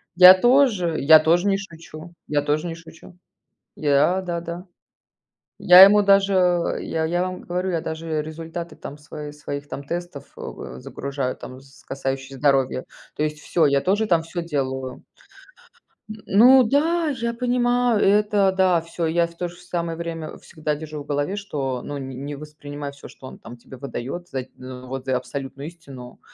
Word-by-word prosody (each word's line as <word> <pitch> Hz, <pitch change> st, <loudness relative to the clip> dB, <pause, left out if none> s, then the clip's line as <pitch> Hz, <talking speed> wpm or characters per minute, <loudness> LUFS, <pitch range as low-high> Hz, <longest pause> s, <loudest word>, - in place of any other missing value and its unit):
Я 180 Hz, +1 st, +11 dB
тоже 230 Hz, -, +3 dB
я 155 Hz, +3 st, +8 dB
тоже 170 Hz, +5 st, +2 dB
не 195 Hz, -1 st, +2 dB
шучу 170 Hz, -3 st, -11 dB
я 145 Hz, -1 st, +1 dB
тоже 150 Hz, +3 st, -1 dB
не 165 Hz, -, -5 dB
шучу! 165 Hz, +2 st, -15 dB, 0.6 s
Я 150 Hz, +5 st, +2 dB
да, 175 Hz, -2 st, -4 dB
да. 170 Hz, +3 st, -7 dB, 0.9 s
Я 180 Hz, 0 st, +9 dB
ему 205 Hz, +1 st, +7 dB
даже, 195 Hz, 0 st, +4 dB
э, 180 Hz, -2 st, +1 dB
я 160 Hz, -1 st, -1 dB
я 175 Hz, +2 st, 0 dB
вам 185 Hz, 0 st, -5 dB
говорю, 180 Hz, +2 st, -3 dB
я 165 Hz, -2 st, -1 dB
даже 160 Hz, -1 st, -3 dB
результаты 165 Hz, +1 st, -7 dB
там 145 Hz, -, -9 dB
свои 150 Hz, 0 st, -9 dB
своих 145 Hz, -1 st, -7 dB
там 140 Hz, -, -6 dB
тестов, 170 Hz, -1 st, -6 dB
э, 65 Hz, -, -8 dB
загружаю 135 Hz, -, -4 dB
там, 130 Hz, +1 st, -10 dB
з 135 Hz, 0 st, -20 dB
касающиеся 135 Hz, 0 st, -4 dB
здоровья, 135 Hz, -2 st, +1 dB, 0.3 s
то 150 Hz, -, -1 dB
есть 150 Hz, 0 st, -3 dB
всё, 160 Hz, +1 st, +1 dB
я 140 Hz, -1 st, +2 dB
тоже 205 Hz, +6 st, +1 dB
там 170 Hz, -4 st, +2 dB
всё 170 Hz, +1 st, -5 dB
делаю. 130 Hz, -5 st, -4 dB, 1.1 s
М, 215 Hz, -, -6 dB
ну 250 Hz, +6 st, +7 dB
да, 315 Hz, +7 st, +1 dB
я 235 Hz, -4 st, -2 dB
понимаю, 245 Hz, -1 st, +1 dB
это 205 Hz, -1 st, +3 dB
да, 185 Hz, -3 st, +3 dB
всё 170 Hz, +1 st, -4 dB
я 170 Hz, +1 st, +1 dB
в 170 Hz, -, -17 dB
то 175 Hz, -, -2 dB
же 175 Hz, 0 st, -13 dB
самое 170 Hz, -2 st, -4 dB
время 165 Hz, -2 st, -6 dB
всегда 155 Hz, -1 st, -4 dB
держу 150 Hz, -1 st, -7 dB
в -, -, -21 dB
голове, 145 Hz, +6 st, -2 dB
что, 140 Hz, -11 st, -4 dB
ну, 145 Hz, -, -5 dB
не 135 Hz, -1 st, -7 dB
не 140 Hz, +3 st, -6 dB
воспринимай 145 Hz, -1 st, -8 dB
всё, 140 Hz, 0 st, -13 dB
что 130 Hz, -, -13 dB
он, -, -, -11 dB
там, 120 Hz, +1 st, -11 dB
тебе 130 Hz, +2 st, -13 dB
выдаёт 140 Hz, +6 st, -6 dB
за 130 Hz, -2 st, -4 dB
вот 130 Hz, +1 st, -8 dB
за 130 Hz, -1 st, +1 dB
абсолютную 135 Hz, +2 st, -7 dB
истину. 140 Hz, -7 st, -12 dB
160 Hz, 175 wpm, -22 LUFS, 140-180 Hz, 1.1 s, Я